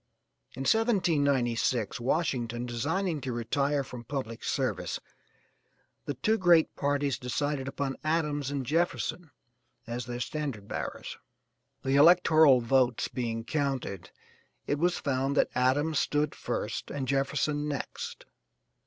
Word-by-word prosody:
In 130 Hz, -, -6 dB
1796, 140 Hz, -, +2 dB
Washington 120 Hz, -3 st, -1 dB
designing 155 Hz, -, -1 dB
to 130 Hz, -, -3 dB
retire 140 Hz, +5 st, 0 dB
from 125 Hz, -2 st, -9 dB
public 120 Hz, -3 st, -5 dB
service, -, -, -1 dB, 1.1 s
the 145 Hz, -, -3 dB
two 220 Hz, -, +1 dB
great 170 Hz, -3 st, +4 dB
parties 145 Hz, -1 st, 0 dB
decided 135 Hz, +2 st, -2 dB
upon 135 Hz, -1 st, -3 dB
Adams 150 Hz, -3 st, 0 dB
and 140 Hz, -2 st, -3 dB
Jefferson 170 Hz, +2 st, -1 dB, 0.6 s
as 120 Hz, +1 st, -5 dB
their 120 Hz, 0 st, -4 dB
standard 130 Hz, -7 st, -4 dB
bearers; -, -, -5 dB, 0.6 s
the 135 Hz, +1 st, +2 dB
electoral 155 Hz, -4 st, +6 dB
votes 125 Hz, 0 st, +2 dB
being 115 Hz, -3 st, -3 dB
counted, 135 Hz, -, -2 dB, 0.6 s
it 145 Hz, -, -1 dB
was 175 Hz, +2 st, +2 dB
found 135 Hz, +1 st, -1 dB
that -, -, +3 dB
Adams 140 Hz, +5 st, +2 dB
stood 150 Hz, +1 st, 0 dB
first -, -, -4 dB
and 135 Hz, -2 st, -3 dB
Jefferson 140 Hz, +2 st, 0 dB
next. 145 Hz, -3 st, -5 dB
140 Hz, 120 wpm, -29 LUFS, 125-150 Hz, 1.1 s, electoral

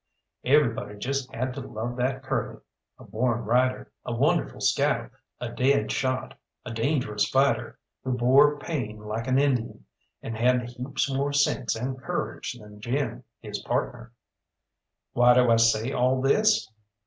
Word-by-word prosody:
Everybody 120 Hz, -7 st, +2 dB
just 135 Hz, +4 st, -3 dB
had 130 Hz, +2 st, -3 dB
to 140 Hz, -, -6 dB
love 120 Hz, -1 st, -5 dB
that 130 Hz, +1 st, -1 dB
Curly -, -, -3 dB, 0.4 s
a -, -, -14 dB
born 120 Hz, +1 st, -1 dB
rider, 125 Hz, +3 st, +1 dB
a -, -, -5 dB
wonderful -, -, +1 dB
scout, -, -, +1 dB, 0.3 s
a -, -, -4 dB
dead 140 Hz, +2 st, +1 dB
shot, 130 Hz, 0 st, -2 dB, 0.3 s
a -, -, -5 dB
dangerous 115 Hz, -3 st, 0 dB
fighter, 135 Hz, +1 st, +1 dB, 0.3 s
who 130 Hz, -, -1 dB
bore 140 Hz, +4 st, +5 dB
pain 125 Hz, -9 st, -4 dB
like 105 Hz, +3 st, -5 dB
an 130 Hz, 0 st, +2 dB
Indian, 135 Hz, -5 st, 0 dB, 0.4 s
and 115 Hz, -, -5 dB
had 125 Hz, +1 st, +1 dB
heaps 130 Hz, +4 st, -2 dB
more 140 Hz, +1 st, -1 dB
sense 140 Hz, -4 st, +1 dB
and 130 Hz, +3 st, -4 dB
courage -, -, -3 dB
than 105 Hz, -1 st, -14 dB
Jim 135 Hz, +6 st, -2 dB, 0.2 s
his -, -, -5 dB
partner. 120 Hz, -, -3 dB, 1.0 s
Why 120 Hz, 0 st, +5 dB
do 125 Hz, -1 st, +5 dB
I 115 Hz, -, +5 dB
say 115 Hz, +2 st, +3 dB
all 130 Hz, 0 st, +2 dB
this? 210 Hz, -, +3 dB
125 Hz, 150 wpm, -26 LUFS, 115-135 Hz, 1.0 s, bore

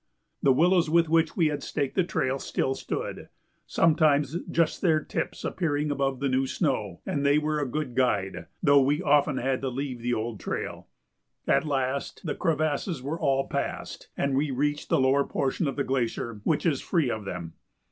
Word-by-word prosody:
The 135 Hz, -, +5 dB
willows 170 Hz, +4 st, +4 dB
with 165 Hz, 0 st, +3 dB
which 165 Hz, 0 st, +2 dB
we 165 Hz, -4 st, +4 dB
had 145 Hz, -, -3 dB
staked 140 Hz, -3 st, -2 dB
the 185 Hz, -, +2 dB
trail 135 Hz, -5 st, -1 dB
still 135 Hz, -, -1 dB
stood, 135 Hz, -, -5 dB, 0.4 s
sometimes 155 Hz, -3 st, +3 dB
just 165 Hz, -2 st, +1 dB
their 160 Hz, -5 st, +3 dB
tips -, -, -4 dB
appearing 150 Hz, -4 st, -1 dB
above 135 Hz, -2 st, -1 dB
the 140 Hz, -, 0 dB
new 130 Hz, 0 st, +1 dB
snow, 110 Hz, -, -1 dB
and 140 Hz, -, -1 dB
they 140 Hz, +1 st, +4 dB
were 150 Hz, 0 st, 0 dB
a 140 Hz, -3 st, -2 dB
good 150 Hz, -1 st, -3 dB
guide, 105 Hz, -7 st, 0 dB, 0.2 s
though 140 Hz, -3 st, +6 dB
we 145 Hz, +3 st, +1 dB
often 145 Hz, -1 st, +3 dB
had 130 Hz, +1 st, 0 dB
to 135 Hz, -, -1 dB
leave 130 Hz, -1 st, -4 dB
the 120 Hz, +1 st, 0 dB
old 110 Hz, -1 st, -4 dB
trail. -, -, -5 dB, 0.6 s
At -, -, +3 dB
last 135 Hz, +3 st, -2 dB
the 160 Hz, -, -1 dB
crevasses 155 Hz, -2 st, -1 dB
were 155 Hz, +5 st, -3 dB
all 135 Hz, 0 st, +1 dB
passed -, -, -4 dB
and 140 Hz, -1 st, 0 dB
we 145 Hz, +2 st, +1 dB
reached 145 Hz, +3 st, -1 dB
the -, -, +3 dB
lower 135 Hz, +2 st, +3 dB
portion 140 Hz, +4 st, -1 dB
of 135 Hz, -, -2 dB
the 140 Hz, -, 0 dB
glacier, 120 Hz, -4 st, -2 dB
which 160 Hz, -, +1 dB
is 150 Hz, -6 st, +1 dB
free 160 Hz, -9 st, +1 dB
of 110 Hz, -2 st, -4 dB
them. 85 Hz, -4 st, -6 dB
140 Hz, 190 wpm, -27 LUFS, 130-155 Hz, 0.6 s, though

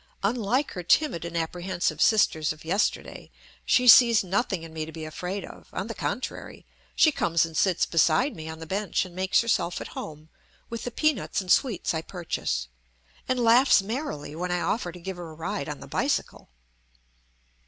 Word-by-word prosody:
Unlike 240 Hz, +6 st, 0 dB
her 180 Hz, -, -5 dB
timid 175 Hz, -, +2 dB
and 170 Hz, 0 st, -4 dB
apprehensive 175 Hz, +2 st, -2 dB
sisters 160 Hz, -8 st, +3 dB
of 155 Hz, +1 st, -10 dB
yesterday, 190 Hz, +6 st, -1 dB, 0.4 s
she 250 Hz, 0 st, +3 dB
sees 235 Hz, -2 st, +8 dB
nothing 190 Hz, -1 st, -1 dB
in 165 Hz, -1 st, -10 dB
me 160 Hz, -1 st, -3 dB
to 160 Hz, -, -7 dB
be 160 Hz, 0 st, -7 dB
afraid 180 Hz, +5 st, -5 dB
of; -, -, -13 dB
on -, -, -4 dB
the -, -, -5 dB
contrary, -, -, -5 dB, 0.3 s
she 315 Hz, -, +5 dB
comes 170 Hz, -, +1 dB
and 165 Hz, -1 st, -10 dB
sits 185 Hz, -1 st, +2 dB
beside 250 Hz, -, +2 dB
ine 160 Hz, 0 st, -7 dB
on 160 Hz, -, -7 dB
the 160 Hz, -, -8 dB
bench 195 Hz, +3 st, -1 dB
and 180 Hz, -1 st, -13 dB
makes 190 Hz, +1 st, +2 dB
herself 215 Hz, -7 st, 0 dB
at -, -, -7 dB
home 155 Hz, 0 st, -8 dB, 0.4 s
with 230 Hz, -, -5 dB
the -, -, -2 dB
peanuts 305 Hz, -1 st, 0 dB
and 185 Hz, -2 st, -3 dB
sweets 225 Hz, -12 st, +2 dB
I 160 Hz, -, -2 dB
purchase, 160 Hz, -, -3 dB, 0.6 s
and 255 Hz, -1 st, 0 dB
laughs 235 Hz, -2 st, +5 dB
merrily 215 Hz, -, -5 dB
when 180 Hz, +2 st, -3 dB
I 175 Hz, 0 st, 0 dB
offer 190 Hz, -5 st, -1 dB
to 180 Hz, -, -12 dB
give 190 Hz, +1 st, -6 dB
her 175 Hz, -2 st, -7 dB
a 155 Hz, -, -11 dB
ride 155 Hz, -3 st, -4 dB
on 150 Hz, -, -6 dB
the -, -, -9 dB
bicycle. -, -, -2 dB
180 Hz, 185 wpm, -26 LUFS, 160-225 Hz, 0.6 s, sees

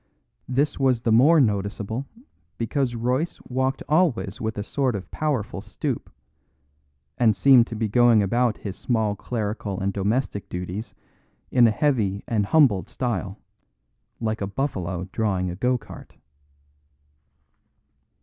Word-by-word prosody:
This 140 Hz, +4 st, 0 dB
was 130 Hz, -3 st, +2 dB
the 115 Hz, -, +1 dB
more 145 Hz, +9 st, +6 dB
noticeable 105 Hz, +2 st, -1 dB, 0.5 s
because 120 Hz, +2 st, -1 dB
Royce 125 Hz, +8 st, -1 dB
walked 130 Hz, +1 st, -1 dB
always 150 Hz, -, +1 dB
with 110 Hz, -1 st, -3 dB
a 105 Hz, -, -2 dB
sort 130 Hz, +1 st, -1 dB
of 95 Hz, -, -7 dB
powerful 145 Hz, -9 st, -2 dB
stoop, -, -, -4 dB, 1.1 s
and 110 Hz, -4 st, +4 dB
seemed 125 Hz, +2 st, +6 dB
to 115 Hz, -, -6 dB
be 110 Hz, 0 st, -1 dB
going 115 Hz, -1 st, +5 dB
about 120 Hz, +3 st, +1 dB
his 100 Hz, -3 st, -6 dB
small 110 Hz, -4 st, 0 dB
clerical 105 Hz, -3 st, -3 dB
and 95 Hz, +1 st, -1 dB
domestic 100 Hz, 0 st, -1 dB
duties 90 Hz, +5 st, -5 dB, 0.6 s
in 120 Hz, -2 st, +6 dB
a -, -, +4 dB
heavy 105 Hz, -5 st, 0 dB
and 105 Hz, -3 st, 0 dB
humbled 105 Hz, -11 st, +3 dB
style, 105 Hz, -5 st, -3 dB, 0.8 s
like 110 Hz, -1 st, -2 dB
a 100 Hz, -, -1 dB
buffalo 95 Hz, -7 st, -3 dB
drawing 95 Hz, -5 st, -1 dB
a -, -, -6 dB
go 125 Hz, +6 st, +1 dB
cart. -, -, -13 dB
115 Hz, 130 wpm, -24 LUFS, 100-130 Hz, 1.1 s, more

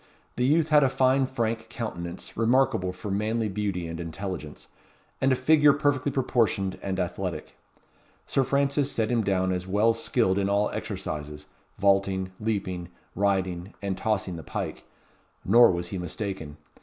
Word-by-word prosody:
The 125 Hz, -, +1 dB
youth 155 Hz, +2 st, +3 dB
had 150 Hz, -2 st, +6 dB
a 135 Hz, -, +4 dB
fine 130 Hz, +1 st, +3 dB
frank 115 Hz, -3 st, -2 dB
countenance, 90 Hz, -8 st, -6 dB
remarkable 115 Hz, -5 st, +2 dB
for 95 Hz, +2 st, -6 dB
manly 110 Hz, +3 st, 0 dB
beauty 100 Hz, -3 st, -2 dB
and 80 Hz, 0 st, -6 dB
intelligence, 85 Hz, -2 st, -6 dB, 0.5 s
and 135 Hz, -, +3 dB
a -, -, +4 dB
figure 150 Hz, +3 st, +5 dB
perfectly 145 Hz, -1 st, +1 dB
proportioned 115 Hz, -8 st, 0 dB
and 95 Hz, -1 st, -3 dB
athletic. 90 Hz, 0 st, -4 dB, 0.7 s
Sir 135 Hz, -, +1 dB
Francis 140 Hz, +1 st, +1 dB
set 110 Hz, 0 st, 0 dB
him 115 Hz, -2 st, +2 dB
down 95 Hz, -2 st, +1 dB
as 90 Hz, 0 st, -3 dB
well 105 Hz, +4 st, +3 dB
skilled 115 Hz, -4 st, +1 dB
in 100 Hz, 0 st, 0 dB
all 100 Hz, +1 st, +2 dB
exercises; 75 Hz, -8 st, -5 dB, 0.3 s
vaulting, 95 Hz, -1 st, +2 dB
leaping, 95 Hz, -5 st, -2 dB, 0.2 s
riding, 95 Hz, -2 st, -1 dB
and 100 Hz, -2 st, -2 dB
tossing 95 Hz, -4 st, -1 dB
the -, -, -6 dB
pike; -, -, -5 dB, 0.6 s
nor 120 Hz, +4 st, +7 dB
was 85 Hz, -1 st, -2 dB
he 95 Hz, -, -4 dB
mistaken. 90 Hz, -4 st, -5 dB
100 Hz, 150 wpm, -26 LUFS, 95-120 Hz, 0.7 s, nor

